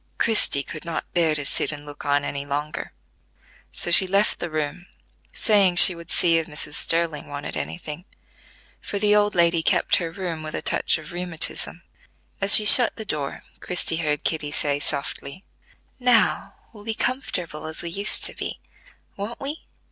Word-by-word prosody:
Christie 210 -10 +1
could 155 +3 -9
not 170 -2 -4
bear 165 -3 +2
to 145 -1 -3
sit - - 0
and 145 -1 -9
look 145 -1 -10
on 145 0 +1
any 140 0 -4
longer, 145 +2 -5 0.8
so 175 - -2
she 190 +2 +7
left 200 +3 +1
the 175 - -4
room, 155 +3 -4 0.4
saying 200 -5 +2
she 180 - +9
would 170 0 -12
see 165 -2 +3
if 160 - -5
Mrs. 150 -1 -4
Sterling 165 -1 +1
wanted 145 0 -5
any - - -4
thing, 165 +1 -9 0.8
for 205 - -5
the 210 +1 +3
old 205 0 +2
lady 170 -1 +3
kept - - +2
her 170 - -3
room 165 -2 -5
with 155 0 -6
a - - -3
touch - - 0
of 155 +2 -11
rheumatism. 175 -2 -2 0.6
As 195 +1 +8
she 215 - +4
shut 235 +2 +8
the 220 - -6
door, 145 -6 -5 0.2
Christie 180 -2 0
heard 150 -3 -1
Kitty 155 -2 -2
say 145 -1 -1
softly: 145 +4 -4 0.6
"Now 245 -3 +1 0.2
we'll 210 -2 -14
be 220 0 -4
comfortable 175 - -4
as 160 +2 -4
we 170 - -5
used 200 +4 -2
to - - 0
be: - - -7 0.6
won't 205 +4 -7
we?" 285 +3 -7
170 Hz, 180 wpm, -23 LUFS, 150-195 Hz, 0.8 s, she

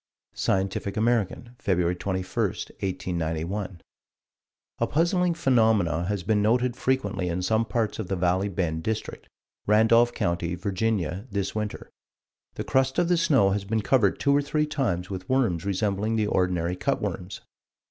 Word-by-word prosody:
Scientific 95 +1 -1
American, 120 +1 0
Feb. 95 -3 +2 0.2
21, 95 -1 -2
1891: 90 0 -3 1.0
"A - - +1
puzzling 170 +2 +1
phenomenon 110 - +2
has 100 -1 -2
been 105 +2 +2
noted 120 +3 +2
frequently 115 -9 -1
in 90 +2 -2
some 110 +4 +2
parts 110 -2 -1
of 110 - -3
the 95 - -1
Valley 90 +2 +1
Bend 85 -4 -2
District, 110 +4 -4 0.4
Randolph 115 +3 +5
County, 85 0 -1
Va., 95 0 -2
this 100 -2 -2
winter. 105 -1 -4 0.6
The - - -3
crust 130 0 +1
of 175 -1 +2
the 175 - +3
snow 135 -12 +3
has 100 0 -1
been 110 +2 -1
covered 105 -4 +2
two 140 0 +3
or 145 - +4
three 150 +1 0
times 100 - -2
with 95 -1 -6
worms 115 -11 +1
resembling 100 +2 0
the 110 -1 +1
ordinary 90 -3 0
cut - - -1
worms. 90 +3 -5
100 Hz, 145 wpm, -26 LUFS, 90-120 Hz, 1.0 s, Randolph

